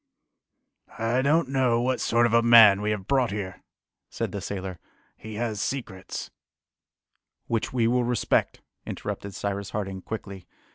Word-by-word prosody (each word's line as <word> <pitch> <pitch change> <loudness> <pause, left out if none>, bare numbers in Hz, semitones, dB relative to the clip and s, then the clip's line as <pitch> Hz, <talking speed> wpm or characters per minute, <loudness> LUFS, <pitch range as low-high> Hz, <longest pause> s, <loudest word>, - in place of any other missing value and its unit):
"I 115 +3 +1
don't 150 +2 +2
know 130 -3 +2
what 125 +1 0
sort 120 +1 +3
of 115 - 0
a 115 - +6
man 115 -4 +8
we 105 - -1
have 105 -2 -3
brought 130 -4 +2
here," 100 -2 -5 0.5
said - - -3
the - - -5
sailor. 95 -3 -5 0.4
"He 110 0 -9
has 110 -2 -2
secrets 115 -8 -5 0.5
" - - -66 0.3
"Which 115 -1 -1
we 120 -3 +1
will 125 +2 +2
respect," 120 -2 0 0.2
interrupted 100 -2 -6
Cyrus 100 0 -3
Harding 95 -2 -4
quickly. 100 -4 -7
110 Hz, 150 wpm, -26 LUFS, 100-120 Hz, 0.5 s, man